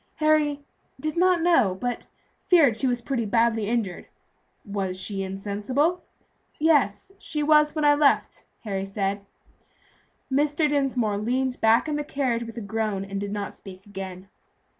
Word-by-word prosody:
Harry 305 -2 +2 0.4
"did 310 +2 -3
not 360 -1 +3
know, 260 - +3
but 245 0 -3 0.4
feared 315 - +5
she 265 - 0
was 245 -1 0
pretty 245 -2 -1
badly 225 0 +1
injured." 220 -5 -2 0.6
"Was 195 -3 -3
she 195 +1 -3
insensible?" 210 - -1 0.6
"Yes, 300 - +2
she 300 -1 -3
was 300 0 +4
when 305 -1 0
I 290 - +6
left," 290 -1 +2 0.2
Harry 195 -3 -3
said. 195 0 -2 1.1
Mr. 295 +3 +2
Dinsmore 260 -8 0
leaned 255 +3 -1
back 225 +6 +4
in 300 -1 -1
the 295 - -2
carriage 260 -5 -1
with 230 0 -10
a - - -4
groan 210 -2 -2
and 195 0 -5
did 200 0 -4
not 205 -1 -4
speak 190 0 -13
again. 190 -2 -8
235 Hz, 150 wpm, -25 LUFS, 200-295 Hz, 1.1 s, I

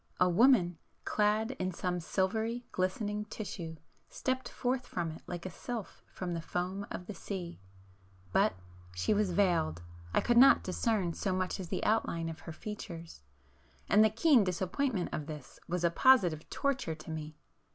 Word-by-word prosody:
A 180 - +5
woman, 180 -3 +4 0.3
clad 215 +2 +2
in 185 0 0
some 180 0 -2
silvery 220 +7 -1
glistening 205 +3 -1
tissue, 190 -6 -6 0.3
stepped 260 0 -2
forth 250 0 -1
from 170 -2 -2
it 160 - -10
like 175 0 -5
a 185 - -4
sylph 230 +3 -6
from 180 -2 -4
the 165 - -2
foam 185 +4 -3
of 180 - -6
the 210 - -6
sea, 180 -4 -6 0.7
but——she 90 - 0
was 210 -1 +2
veiled,—I 85 - 0
could 240 - +2
not 275 +2 +7
discern 190 -2 0
so 190 +2 -1
much 185 +1 -1
as 180 -3 -6
the - - -2
outline 170 -6 +1
of 160 - -7
her 165 - -8
features,—and 160 - -3
the 220 - +5
keen 240 +2 +5
disappointment 190 +3 -1
of 150 - -3
this 150 -5 -9
was 175 0 -2
a 170 - +4
positive 175 - +4
torture 270 - -1
to 155 +1 -9
me. 155 -1 -6
185 Hz, 155 wpm, -32 LUFS, 165-215 Hz, 0.7 s, not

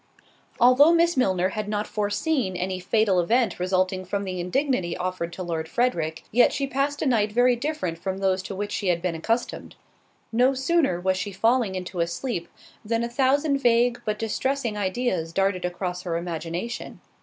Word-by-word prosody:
Although 260 +7 +6
Miss 340 0 +3
Milner 185 -7 +2
had 210 +1 -4
not 210 0 -1
foreseen 210 - -1
any 185 +1 -2
fatal 195 0 +2
event 220 +2 +1
resulting 185 +1 0
from 200 +2 -3
the 185 -2 -4
indignity 185 - 0
offered 180 -2 -3
to 185 - -5
Lord 160 -2 -3
Frederick, 165 -11 -1
yet 240 +2 +5
she 280 - -1
passed 275 +2 -1
a - - -1
night 220 -6 +2
very 245 +2 +4
different 235 - -3
from 190 +1 -3
those 190 -1 +1
to 195 - -7
which 205 +1 -4
she 200 - -2
had 175 -2 +2
been 180 0 -2
accustomed. 225 +9 -2 0.6
No 250 +4 +3
sooner 270 - +1
was 185 +1 0
she 200 +2 -3
falling 225 +1 +1
into 180 -1 -5
a 170 - +2
sleep, 170 0 -4 0.4
than 230 +1 -1
a 235 - -2
thousand 275 +3 +2
vague, 240 -1 +3
but 215 0 -2
distressing, 235 +2 -1
ideas 190 -4 -1
darted 195 -1 +1
across 180 0 -3
her 170 -2 -2
imagination. 170 +6 -5
205 Hz, 180 wpm, -25 LUFS, 180-245 Hz, 0.6 s, Although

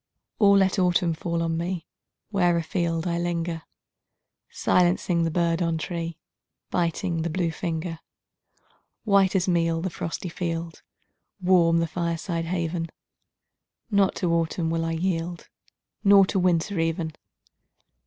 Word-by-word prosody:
Or 200 -2 +6
let 190 0 +3
autumn 180 -2 +2
fall 170 +1 -2
on 165 0 -1
me 170 0 -3 0.5
Where 175 -4 +3
afield 165 0 -1
I 170 -1 0
linger, 170 -1 -2 0.9
Silencing 175 -1 +2
the - - +1
bird 170 +1 +1
on 165 -1 +1
tree, 165 0 -4 0.5
Biting 170 0 0
the 170 - -1
blue 170 0 0
finger. 165 0 -4 1.0
White 200 -3 +3
as 185 -1 +2
meal 165 -2 +2
the 185 +2 -3
frosty 165 +3 -4
field 165 -1 -4 0.6
Warm 175 -3 +4
the 165 - +2
fireside 170 0 -2
haven 165 -1 -2 1.0
Not 200 -2 +3
to 170 -2 0
autumn 165 0 0
will 165 0 0
I 165 - -1
yield, 170 0 -2 0.5
Not 200 -2 +6
to 195 - +1
winter 180 +1 +1
even! 165 -1 -1
170 Hz, 130 wpm, -25 LUFS, 165-180 Hz, 1.0 s, Or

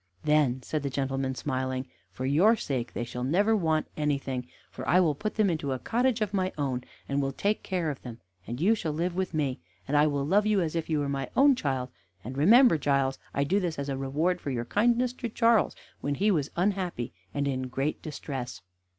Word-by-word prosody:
"Then," 145 -4 +2
said 155 - -2
the 140 - -2
gentleman 135 -1 -2
smiling, 130 -1 -2 0.2
"for 125 +8 -5
your 175 - +5
sake 130 - -3
they - - -2
shall 125 +1 -5
never 200 - +3
want 160 -6 +1
anything, 140 -4 -1 0.2
for 130 - -7
I 180 - +6
will 165 -5 +3
put 210 +9 -4
them 215 -2 +3
into 155 -6 -1
a - - -2
cottage 240 - 0
of 210 -1 -1
my 185 -1 +1
own, 130 -4 -1 0.2
and 140 +1 0
will 135 0 -1
take 205 +9 0
care 175 -5 -1
of 140 - -9
them, 120 -2 -9 0.3
and 120 +2 -4
you 195 +8 +4
shall 165 -8 -2
live 170 +3 -1
with 185 -2 -2
me, 140 -4 0 0.3
and 145 - 0
I 145 +1 +5
will 140 -2 -1
love 205 +7 +3
you 210 -2 +3
as 165 -2 -1
if 165 -1 -2
you 155 - +1
were 145 -1 0
my 135 -1 -2
own 280 +1 +7
child, 130 - -2 0.3
and 125 +4 -6
remember, 205 - +6
Giles, 140 -1 +1
I 140 - 0
do 190 +8 +2
this 175 -4 -2
as 140 0 -3
a 135 - -1
reward 150 +7 0
for - - -4
your 120 -3 -2
kindness 240 - +2
to 245 -2 -5
Charles 230 -4 +3 0.2
when 145 0 -1
he 210 +7 +2
was 150 -6 0
unhappy 180 - -1 0.2
and 140 0 -1
in 130 -2 -2
great 135 +4 -2
distress." 135 -5 -6
150 Hz, 220 wpm, -28 LUFS, 135-185 Hz, 0.3 s, own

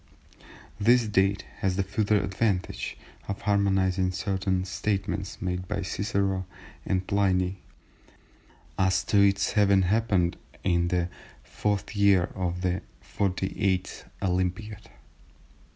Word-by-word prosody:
This 120 +3 +5
date 100 -1 +1
has 95 -2 0
the 100 - +1
further 105 +1 +1
advantage 100 -1 -1 0.3
of 100 - -4
harmonising 95 -2 +2
certain 95 0 -1
statements 95 0 -2
made 90 0 -3
by 100 +2 -2
Cicero 100 -2 -1 0.4
and 95 0 0
Pliny 95 -2 +1 1.2
as 95 -1 +3
to 100 - +2
its 100 0 +3
having 100 -2 +4
happened 95 -3 +1 0.3
in 85 -2 +2
the 90 -1 0 0.4
4th 105 +1 -2
year 100 -3 +5
of 90 -1 -2
the 90 0 0 0.3
48th 95 -1 -1 0.2
Olympiad. 95 +3 -2
95 Hz, 105 wpm, -27 LUFS, 90-100 Hz, 1.2 s, This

